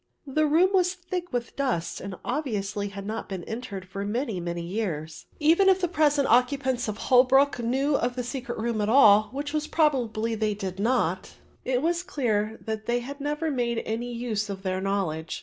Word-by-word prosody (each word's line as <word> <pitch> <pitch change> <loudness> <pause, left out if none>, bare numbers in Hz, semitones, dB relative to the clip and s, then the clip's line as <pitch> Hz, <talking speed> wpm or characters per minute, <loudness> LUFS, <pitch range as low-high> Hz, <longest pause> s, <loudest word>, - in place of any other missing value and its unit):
The 305 +2 +1
room 340 +6 +4
was 365 -1 +3
thick 355 0 -5
with 240 -2 -3
dust 255 -12 -2
and 195 -1 -6
obviously 210 -7 -2
had 200 0 -7
not 220 +2 -5
been 190 -3 -5
entered 205 -4 -6
for 195 +1 -5
many 220 -1 -2
many 170 0 -4
years. 170 -5 -4
Even 330 +6 +5
if 380 0 +4
the 360 - +1
present 295 -4 +2
occupants 250 0 +2
of 215 0 -3
Holwick 260 +3 +4
knew 265 +5 +1
of 245 +1 -1
the 250 - -2
secret 245 0 -5
room 225 -1 -1
at 210 - 0
all, 215 -4 +6
which 290 +2 -4 0.2
probably 235 -8 +1
they 215 -1 0
did 190 -2 -5
not, 200 -6 0 0.3
it 255 +1 0
was 340 +1 +1
clear 220 -9 -1
that 220 -1 -4
they 240 0 0
never 300 +2 -2
made 240 -3 -1
any 235 +2 -3
use 225 -3 -2
of 195 -1 -6
their 185 -1 -1
knowledge. 185 -5 -2
235 Hz, 185 wpm, -26 LUFS, 205-280 Hz, 0.3 s, all